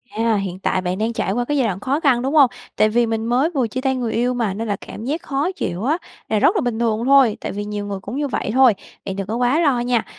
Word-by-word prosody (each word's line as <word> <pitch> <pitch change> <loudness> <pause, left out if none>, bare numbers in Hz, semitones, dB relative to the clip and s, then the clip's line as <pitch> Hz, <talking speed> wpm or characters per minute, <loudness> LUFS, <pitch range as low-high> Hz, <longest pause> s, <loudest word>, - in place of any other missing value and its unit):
À, 225 0 +2
hiện 190 -2 -3
tại 185 - 0
bạn 180 0 -2
đang 220 +3 -1
trải 195 - -1
qua 245 +3 -1
cái 290 +3 -1
giai 255 -4 +2
đoạn 190 -3 -3
khó 265 +7 -1
khăn, 270 -6 +3
đúng 270 +3 -2
hông? 280 -4 +7 0.3
Tại 215 - +3
vì 235 +2 +2
mình 225 0 -2
mới 250 +7 +2
vừa 270 -8 0
chia 255 +4 -4
tay 265 -1 +1
người 240 -3 -2
yêu 245 +2 +1
mà, 230 -6 -1
nên 225 +3 -4
là 205 - 0
cảm 210 - -10
giác 305 +6 -2
khó 285 +6 -1
chịu 185 - -4
á 295 +7 +1 0.3
là 215 - +2
rất 345 - +4
là 400 - +2
bình 240 -2 -2
thường 230 -1 0
thôi, 270 -5 +5
tại - - -4
vì 205 +1 -4
nhiều 205 -1 -4
người 200 -1 -4
cũng 205 +5 -7
như 290 0 0
vậy 250 - -2
thôi, 260 -2 +6 0.3
bạn 190 - -4
đừng 195 -1 -4
có 220 - -2
quá 250 +5 +2
lo 285 -7 +2
nha! 240 -1 0
235 Hz, 300 wpm, -20 LUFS, 210-265 Hz, 0.3 s, hông